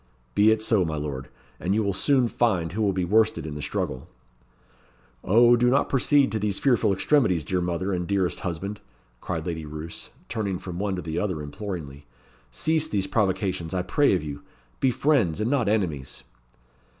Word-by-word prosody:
"Be 105 Hz, +7 st, +5 dB
it 110 Hz, 0 st, +2 dB
so, 110 Hz, -4 st, +3 dB
my 80 Hz, -2 st, -2 dB
lord. 70 Hz, -3 st, -5 dB, 0.3 s
And 95 Hz, +3 st, 0 dB
you 110 Hz, -, +2 dB
will 100 Hz, -1 st, 0 dB
soon 130 Hz, +5 st, +3 dB
find 95 Hz, -9 st, 0 dB
who 110 Hz, -, -3 dB
will 100 Hz, -2 st, +3 dB
be 90 Hz, -1 st, -1 dB
worsted 110 Hz, +2 st, +2 dB
in 75 Hz, -, -5 dB
the 75 Hz, -, -6 dB
struggle." 70 Hz, -2 st, -3 dB, 1.2 s
"Oh, 120 Hz, +4 st, +6 dB
do 120 Hz, +1 st, +3 dB
not 140 Hz, +3 st, +2 dB
proceed 140 Hz, +1 st, +3 dB
to 110 Hz, -, -1 dB
these 100 Hz, -1 st, -1 dB
fearful 120 Hz, -7 st, +2 dB
extremities, 95 Hz, -, +2 dB
dear 90 Hz, -1 st, 0 dB
mother, 90 Hz, +3 st, -1 dB
and 90 Hz, -1 st, -2 dB
dearest 95 Hz, -3 st, 0 dB
husband!" 95 Hz, +4 st, -4 dB, 0.4 s
cried 80 Hz, +5 st, -4 dB
Lady 80 Hz, -2 st, -3 dB
Roos, 75 Hz, +2 st, -7 dB, 0.2 s
turning 105 Hz, -5 st, -2 dB
from 90 Hz, -1 st, -7 dB
one 100 Hz, -1 st, -1 dB
to 90 Hz, -, -5 dB
the 80 Hz, +1 st, -3 dB
other 95 Hz, -6 st, -2 dB
imploringly. 75 Hz, -, -7 dB, 0.4 s
"Cease 155 Hz, -, 0 dB
these 100 Hz, -10 st, -1 dB
provocations, 95 Hz, -4 st, -1 dB
I 90 Hz, -, 0 dB
pray 145 Hz, +1 st, +3 dB
of 85 Hz, -, -2 dB
you. 70 Hz, -2 st, -6 dB, 0.4 s
Be 135 Hz, -, +3 dB
friends, 125 Hz, -, +2 dB
and 110 Hz, +4 st, 0 dB
not 125 Hz, -7 st, +2 dB
enemies." 80 Hz, -, -2 dB
95 Hz, 185 wpm, -25 LUFS, 80-110 Hz, 1.2 s, Oh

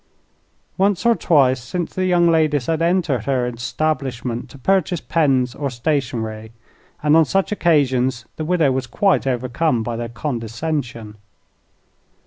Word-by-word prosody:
Once 200 Hz, +2 st, +1 dB
or 235 Hz, -, +6 dB
twice 135 Hz, -, +2 dB
since 170 Hz, +7 st, -4 dB
the 185 Hz, 0 st, -1 dB
young 175 Hz, -1 st, +3 dB
ladies 155 Hz, -5 st, +2 dB
had 165 Hz, -1 st, -1 dB
entered 165 Hz, -, +1 dB
her 130 Hz, -2 st, 0 dB
establishment 125 Hz, -1 st, -3 dB
to 140 Hz, -, -13 dB
purchase 180 Hz, +3 st, +1 dB
pens 135 Hz, -7 st, +1 dB
or 140 Hz, +2 st, -3 dB
stationery, 115 Hz, -5 st, -3 dB, 0.5 s
and 150 Hz, +1 st, +4 dB
on 165 Hz, -, +7 dB
such 195 Hz, +6 st, 0 dB
occasions 130 Hz, -, +1 dB
the 155 Hz, -, -4 dB
widow 160 Hz, -4 st, +2 dB
was 130 Hz, -1 st, -2 dB
quite 190 Hz, -, +1 dB
overcome 125 Hz, 0 st, 0 dB
by 115 Hz, +1 st, -3 dB
their 115 Hz, 0 st, -4 dB
condescension. 120 Hz, -2 st, -4 dB
135 Hz, 135 wpm, -20 LUFS, 120-165 Hz, 0.5 s, on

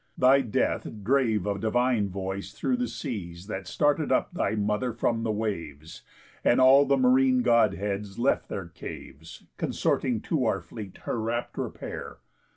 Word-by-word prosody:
Thy 130 Hz, +2 st, +5 dB
death 115 Hz, -5 st, -1 dB, 0.2 s
drave 115 Hz, -4 st, +2 dB
a 100 Hz, -1 st, -1 dB
divine 115 Hz, -1 st, +1 dB
voice 95 Hz, +1 st, -5 dB
through 130 Hz, +1 st, -1 dB
the 125 Hz, 0 st, -1 dB
seas 95 Hz, -7 st, -6 dB
That 95 Hz, -3 st, -6 dB
started 145 Hz, -, +1 dB
up -, -, +1 dB
thy 140 Hz, -, 0 dB
mother 105 Hz, +4 st, 0 dB
from 115 Hz, 0 st, 0 dB
the 115 Hz, -, -2 dB
waves; 85 Hz, -8 st, -4 dB, 0.4 s
And 120 Hz, -, +4 dB
all 135 Hz, +2 st, +7 dB
the 140 Hz, 0 st, +3 dB
márine 255 Hz, 0 st, +4 dB
Godheads 105 Hz, -, +1 dB
left 125 Hz, +4 st, +1 dB
their 95 Hz, -4 st, -5 dB
caves, 80 Hz, -2 st, -10 dB
Consorting -, -, 0 dB
to -, -, 0 dB
our -, -, +1 dB
fleet 100 Hz, -4 st, -9 dB
her 115 Hz, -, -2 dB
rapt 120 Hz, +2 st, -3 dB
repair. -, -, -6 dB
110 Hz, 155 wpm, -27 LUFS, 100-130 Hz, 0.4 s, all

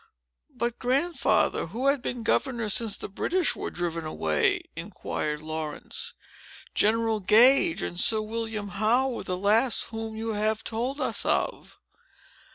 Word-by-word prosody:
"But, 235 Hz, 0 st, -3 dB
Grandfather, 275 Hz, -, +1 dB
who 230 Hz, +10 st, -4 dB
had 275 Hz, -1 st, +3 dB
been 245 Hz, -2 st, -4 dB
governor 235 Hz, -2 st, 0 dB
since 215 Hz, 0 st, +1 dB
the -, -, -5 dB
British 345 Hz, -, 0 dB
were -, -, -4 dB
driven 170 Hz, -1 st, -3 dB
away?" 80 Hz, -, 0 dB
inquired 165 Hz, -4 st, -4 dB
Laurence. 155 Hz, -1 st, -4 dB, 0.6 s
"General 225 Hz, +1 st, +2 dB
Gage 255 Hz, -, +5 dB
and 175 Hz, -, -3 dB
Sir 220 Hz, +3 st, +4 dB
William 215 Hz, -1 st, -4 dB
Howe 220 Hz, +7 st, +2 dB
were 245 Hz, -, -5 dB
the 180 Hz, -, -3 dB
last 220 Hz, +6 st, +2 dB
whom 225 Hz, -1 st, -5 dB
you 225 Hz, +1 st, -4 dB
have 215 Hz, +1 st, 0 dB
told 245 Hz, +6 st, -2 dB
us -, -, -1 dB
of." -, -, -1 dB
220 Hz, 140 wpm, -27 LUFS, 195-245 Hz, 0.6 s, Gage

